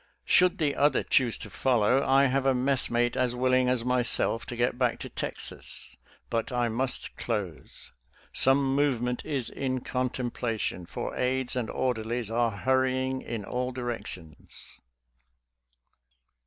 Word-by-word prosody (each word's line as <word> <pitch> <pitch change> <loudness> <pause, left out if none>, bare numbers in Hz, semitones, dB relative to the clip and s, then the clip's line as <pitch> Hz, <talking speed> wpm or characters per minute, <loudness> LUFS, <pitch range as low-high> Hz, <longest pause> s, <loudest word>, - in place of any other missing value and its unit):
Should 180 +1 +4
the 150 -5 0
other 145 -1 +3
choose 125 -4 +2
to - - -8
follow, 125 +1 +2
I 135 +1 +4
have 135 0 +1
a 135 - +4
messmate 125 -2 +1
as 125 -1 +1
willing 130 0 +2
as 125 -2 0
myself 125 -2 +2
to 120 - -5
get 120 +1 0
back 125 -2 +2
to - - -6
Texas. - - -6 0.4
But 115 +2 -1
I 120 -1 +1
must 125 +3 -3
close. 105 -9 -4 0.4
Some 135 0 +3
movement 125 -4 0
is 140 -6 -2
in 130 -2 -2
contemplation, 120 -7 -2
for - - -5
aides 130 0 0
and 120 -3 -2
orderlies 120 -2 -2
are 120 0 +2
hurrying 130 +4 0
in 115 -3 -5
all 125 +3 -2
directions. 120 -10 -7
125 Hz, 135 wpm, -28 LUFS, 120-130 Hz, 0.4 s, Should